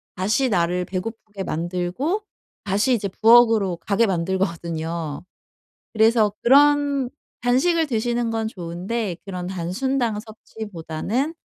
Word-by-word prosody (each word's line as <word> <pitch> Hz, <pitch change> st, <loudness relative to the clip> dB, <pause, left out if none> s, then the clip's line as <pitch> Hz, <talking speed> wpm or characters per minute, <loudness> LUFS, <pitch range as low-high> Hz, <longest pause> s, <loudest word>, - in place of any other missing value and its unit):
다시 215 Hz, +8 st, +1 dB
나를 180 Hz, -1 st, +1 dB
배고프게 205 Hz, +1 st, -5 dB
만들고 180 Hz, -, -2 dB, 0.4 s
다시 205 Hz, +6 st, +2 dB
이제 215 Hz, -4 st, 0 dB
부엌으로 225 Hz, -3 st, +5 dB
가게 200 Hz, +6 st, +1 dB
만들거든요. 170 Hz, -4 st, -2 dB, 0.7 s
그래서 220 Hz, -1 st, +4 dB
그런 285 Hz, 0 st, +4 dB, 0.3 s
간식을 315 Hz, +7 st, +2 dB
드시는 235 Hz, -1 st, -1 dB
건 225 Hz, -1 st, -1 dB
좋은데 185 Hz, +2 st, -4 dB
그런 180 Hz, -2 st, -5 dB
단순당 210 Hz, +6 st, -1 dB
섭취보다는 220 Hz, -, -4 dB
215 Hz, 265 characters per minute, -22 LUFS, 180-240 Hz, 0.7 s, 부엌으로